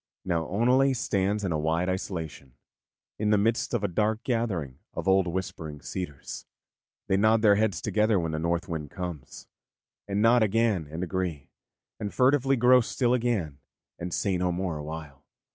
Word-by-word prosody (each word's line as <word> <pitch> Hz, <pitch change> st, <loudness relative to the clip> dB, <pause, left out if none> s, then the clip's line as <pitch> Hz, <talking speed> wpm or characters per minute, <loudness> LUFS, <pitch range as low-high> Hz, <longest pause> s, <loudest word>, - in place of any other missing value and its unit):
Now 85 Hz, -4 st, 0 dB
Oneleigh 125 Hz, +6 st, +3 dB
stands 100 Hz, -2 st, 0 dB
in 95 Hz, -, -1 dB
a 80 Hz, -, 0 dB
wide 80 Hz, +3 st, 0 dB
isolation, 80 Hz, -, -4 dB, 0.6 s
in 105 Hz, 0 st, +1 dB
the 105 Hz, -, +4 dB
midst 110 Hz, +3 st, +1 dB
of 110 Hz, -, -1 dB
a -, -, +2 dB
dark 105 Hz, +5 st, 0 dB
gathering 95 Hz, -, -2 dB, 0.2 s
of -, -, -4 dB
old 95 Hz, -1 st, +4 dB
whispering 85 Hz, -4 st, -4 dB
cedars. 75 Hz, 0 st, -6 dB, 0.6 s
They 95 Hz, -, +1 dB
nod 110 Hz, +2 st, +3 dB
their 105 Hz, -2 st, +7 dB
heads 100 Hz, -3 st, +1 dB
together 105 Hz, -1 st, +2 dB
when 85 Hz, -2 st, -2 dB
the 80 Hz, -, -2 dB
North 85 Hz, +2 st, -1 dB
Wind 80 Hz, -4 st, -4 dB
comes, 90 Hz, -6 st, -7 dB, 0.6 s
and 100 Hz, 0 st, -1 dB
nod 115 Hz, +2 st, +5 dB
again 110 Hz, -5 st, +2 dB
and 80 Hz, +4 st, -4 dB
agree, 90 Hz, -5 st, -3 dB, 0.5 s
and 105 Hz, -2 st, -3 dB
furtively 135 Hz, +1 st, +3 dB
grow 125 Hz, +1 st, +6 dB
still 120 Hz, +1 st, 0 dB
again, 110 Hz, -, -1 dB, 0.4 s
and 85 Hz, +1 st, -4 dB
say 95 Hz, +2 st, 0 dB
no 90 Hz, 0 st, 0 dB
more 90 Hz, -1 st, -2 dB
awhile. 75 Hz, -2 st, -8 dB
95 Hz, 165 wpm, -27 LUFS, 80-110 Hz, 0.6 s, their